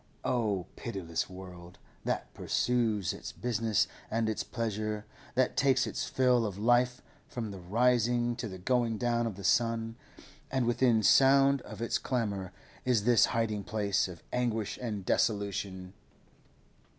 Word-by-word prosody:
Oh, 105 -7 0
pitiless 90 -9 -4
world, 90 -1 -11 0.3
that - - -2
pursues 115 -6 0
its - - -7
business 110 -3 0 0.2
and 115 0 0
its 110 - -1
pleasure, 110 -2 -3 0.3
that 130 0 +2
takes 135 -2 +3
its 110 - -3
fill 125 -2 +3
of 100 -4 -3
life 120 +3 +2 0.2
from 115 -4 -5
the 95 - -8
rising 120 +4 +2
to 120 -1 -3
the 95 -3 -7
going 115 +3 +1
down 120 0 +1
of 110 - -4
the 100 - -9
sun, 115 +1 +1 0.5
and 130 -2 0
within 120 -2 +3
sound 135 +3 +5
of 110 0 -7
its 115 0 0
clamour 100 -7 -2 0.3
is 120 -5 +2
this 120 -1 +5
hiding 110 -3 -1
place 100 -2 0
of 90 -3 -11
anguish 115 -4 -1
and 105 -6 -4
desolation! 100 -3 -1
115 Hz, 140 wpm, -30 LUFS, 100-120 Hz, 0.5 s, sound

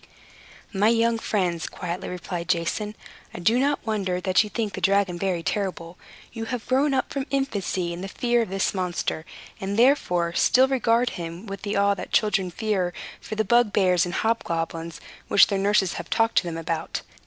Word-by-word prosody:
"My 200 +2 +3
young 230 0 +3
friends," 180 -7 -1
quietly 180 0 -5
replied 180 -1 -5
Jason, 185 +5 -1 0.4
"I - - -5
do 225 +8 +3
not 285 +2 0
wonder 195 -5 -1
that 185 +3 +3
you 210 - -7
think 215 -2 -3
the - - -5
dragon 195 -3 +2
very 180 -3 -1
terrible. 180 -4 -3 0.4
You 225 -1 -4
have 245 0 -4
grown 270 +2 +2
up 260 - -1
from 275 0 -3
infancy 200 -10 -1
in 170 - -7
the 195 - -4
fear 240 +4 +1
of 225 - -3
this 195 0 0
monster, 180 -4 -2 0.3
and 195 +2 -3
therefore 180 -10 +3
still 255 +8 +4
regard 245 -2 +2
him 170 +3 -7
with 195 -1 -7
the 205 0 -3
awe 200 0 +3
that 200 - -7
children 195 -4 +2
feel 190 -2 -1 0.3
for 215 - -6
the 220 0 0
bugbears 200 -6 +3
and 175 -1 -3
hobgoblins 165 -7 -2 0.3
which 200 - +7
their 200 - -1
nurses 195 -2 +2
have - - -7
talked 225 0 +1
to - - -6
them 165 -1 -4
about. 165 0 -3
195 Hz, 185 wpm, -25 LUFS, 175-225 Hz, 0.4 s, which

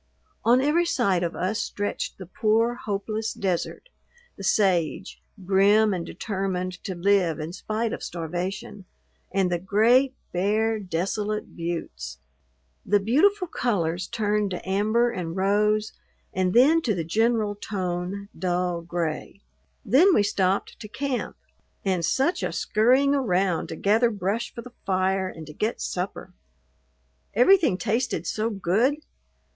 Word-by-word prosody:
On 245 +2 +5
every 320 +5 +2
side 200 - +1
of 170 -1 -2
us 200 +5 -1
stretched 205 0 -3
the 185 - -8
poor, 220 +5 +1
hopeless 215 0 -3
desert, 185 - -2 0.5
the 195 - -9
sage, 185 -5 +1 0.2
grim 200 +3 +4
and 175 -2 -2
determined 185 -1 -4
to 190 -4 -3
live 175 -3 +2
in 155 +2 -5
spite 220 +3 -2
of - - -5
starvation, 180 +4 -5 0.5
and 190 -2 +1
the 175 - 0
great, 235 +8 +3 0.2
bare, 215 +4 +1
desolate 205 +3 -3
buttes. 65 - -5 0.7
The 205 +1 +3
beautiful 365 - +3
colors 180 - -1
turned 210 -2 0
to 180 0 -6
amber 215 +5 +2
and 175 -6 -4
rose, 210 +2 +2 0.4
and 185 +1 0
then 300 +7 +6
to 225 -9 0
the 170 - -2
general 220 +4 +1
tone, 190 -1 -4
dull 180 -1 -1
gray. 170 +2 -4 0.4
Then 330 - +5
we 205 - +4
stopped 195 -1 0
to 210 - -8
camp, 260 +4 -3 0.5
and 185 -3 +1
such 300 - +1
a - - -1
scurrying 255 +6 +3
around 190 - +1
to - - -6
gather 220 +7 +3
brush 205 +2 -2
for 235 - -8
the 250 0 -12
fire 190 0 +1
and 160 -3 -9
to 150 - -10
get 215 +8 -2
supper! 180 0 -4 1.0
Everything 300 - +5
tasted 220 -4 -1
so 215 +6 -1
good! 210 +7 +1
200 Hz, 135 wpm, -25 LUFS, 180-225 Hz, 1.0 s, then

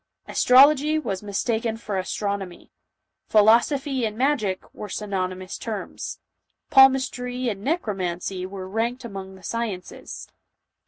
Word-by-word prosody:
Astrology 285 +4 +5
was 200 -11 -3
mistaken 220 +2 -1
for 215 -3 -5
astronomy; 195 -1 -4 0.6
philosophy 240 +5 +3
and 215 -1 -2
magic 250 -8 0
were 210 - -7
synony 190 -4 -3
mous 185 0 -7
terms; 215 -4 -5 0.5
palmistry 255 -2 +4
and 200 -3 -5
necromancy 190 - -2
were 190 -1 -7
ranked 230 +5 -2
among 195 -3 -7
the 190 - -16
sciences; 220 -6 -5
the - - -33
215 Hz, 115 wpm, -24 LUFS, 195-250 Hz, 0.6 s, Astrology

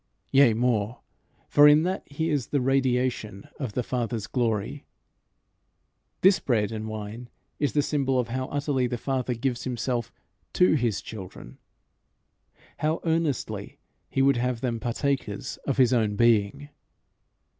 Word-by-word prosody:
Yea 135 -5 +5
more; 115 -1 0 0.5
for 145 0 +7
in 150 +1 +6
that 185 +2 -1
he 160 +3 -1
is 140 -5 0
the 145 - 0
radiation 125 -5 0
of 130 -7 -4
the 125 - -1
Father's 115 -3 -2
glory, 115 +2 -1 1.4
this 190 +1 +5
bread 110 -4 0
and 110 -1 -4
wine 110 +3 -7 0.3
is 145 - 0
the 145 - +2
symbol 135 -3 0
of 125 -2 0
how 130 +2 -2
utterly 140 -3 0
the 120 0 -3
Father 130 -1 -2
gives 120 +1 -2
himself 120 -1 -2 0.4
to 180 - +4
his 115 -9 0
children, 95 - -10 1.2
how 155 +2 0
earnestly 160 -4 -2 0.3
he 135 - +1
would 135 -2 +4
have 125 -1 -1
them 120 -3 -1
partakers 125 -2 -2
of 140 - 0
his 130 -2 +4
own 110 -4 +1
being. 115 +5 +2
125 Hz, 140 wpm, -26 LUFS, 115-140 Hz, 1.4 s, for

